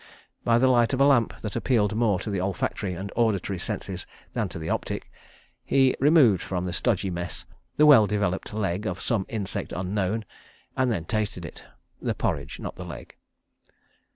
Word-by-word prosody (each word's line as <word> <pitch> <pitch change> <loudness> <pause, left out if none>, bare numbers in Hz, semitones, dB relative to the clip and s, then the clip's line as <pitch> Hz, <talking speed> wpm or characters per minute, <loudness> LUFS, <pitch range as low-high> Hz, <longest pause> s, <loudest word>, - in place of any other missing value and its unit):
By 115 0 +4
the 125 - +4
light 120 -1 +4
of 130 - 0
a - - +7
lamp 130 -6 +3
that 105 - -4
appealed 115 -4 +2
more 110 -5 +2
to 105 - -4
the 95 -2 -1
olfactory 95 0 -2
and 100 +3 -6
auditory 100 -5 +1
senses - - -4 0.3
than - - -1
to - - -7
the 80 0 -5
optic, - - -3 0.5
he 135 -1 +3
removed 140 - +5
from 90 -2 -3
the 90 -1 -3
stodgy 95 +2 0
mess 85 0 -4 0.3
the 150 - +6
well 135 -8 +8
developed 100 -2 -1
leg 105 -1 -2
of 90 0 -3
some 105 -2 -1
insect 105 -4 -3
unknown, 95 +4 -1 0.5
and 130 -2 +2
then 85 -7 -2
tasted 110 +2 -2
it—(the - - -7
porridge, - - -2
not - - -6
the - - -6
leg). - - -9
105 Hz, 175 wpm, -26 LUFS, 95-120 Hz, 0.5 s, well